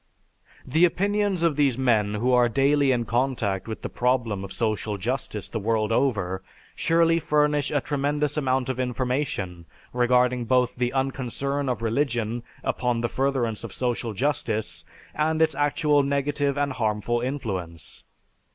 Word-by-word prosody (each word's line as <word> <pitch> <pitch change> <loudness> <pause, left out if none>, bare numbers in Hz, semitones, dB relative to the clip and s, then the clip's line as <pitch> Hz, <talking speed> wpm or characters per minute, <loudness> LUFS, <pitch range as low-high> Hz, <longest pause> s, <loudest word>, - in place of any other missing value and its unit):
The 160 +6 +2
opinions 200 +1 +1
of 165 -3 +3
these 140 -4 +2
men 110 -5 +2
who 120 +4 +1
are 125 -1 +4
daily 140 +2 +3
in 120 -2 0
contact 115 -6 -1
with 110 - -6
the - - -2
problem 120 -5 0
of 100 - -7
social 110 -1 -1
justice 115 -1 -3
the 115 - -4
world 110 0 0
over 100 -7 0 0.3
surely 165 0 +3
furnish 150 -2 +1
a 145 -2 0
tremendous 145 +1 -1
amount 130 -3 0
of 130 -1 -3
information 125 - -2 0.3
regarding 125 0 +2
both 125 0 +2
the 125 0 0
unconcern 135 +1 -2
of 120 -2 -2
religion 120 -1 0 0.2
upon 125 -2 0
the 120 - -1
furtherance 130 -5 -1
of 115 - -6
social 120 -3 -2
justice 110 - -1 0.3
and 155 +1 0
its 160 -1 +3
actual 145 +1 +2
negative 140 0 0
and 145 0 0
harmful 115 0 -1
influence. 95 - -5
125 Hz, 145 wpm, -25 LUFS, 115-145 Hz, 0.3 s, are